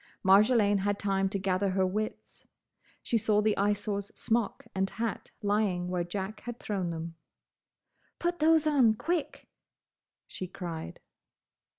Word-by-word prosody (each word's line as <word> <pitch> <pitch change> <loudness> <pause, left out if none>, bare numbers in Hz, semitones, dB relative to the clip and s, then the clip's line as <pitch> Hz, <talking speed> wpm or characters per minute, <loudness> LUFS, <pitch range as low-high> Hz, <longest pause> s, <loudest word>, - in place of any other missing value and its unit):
Marjolaine 205 +1 +5
had 200 +1 0
time 195 -1 0
to 200 - -2
gather 190 +1 0
her 190 0 +2
wits. 215 +4 -4 0.6
She 230 - +1
saw 215 -1 +2
the 210 0 +2
Eyesore's 205 0 -1
smock 230 -2 -1
and 195 0 0
hat 225 0 -4
lying 200 -4 +1
where 180 -1 0
Jack 195 +4 -5
had 240 0 -7
thrown 190 -4 -2
them. 165 0 -5 1.0
"Put 345 0 -1
those 320 0 +4
on! 265 -8 +4
Quick!" 330 +6 -3 0.8
she 185 - -6
cried. 170 - -7
205 Hz, 130 wpm, -30 LUFS, 190-220 Hz, 1.0 s, Marjolaine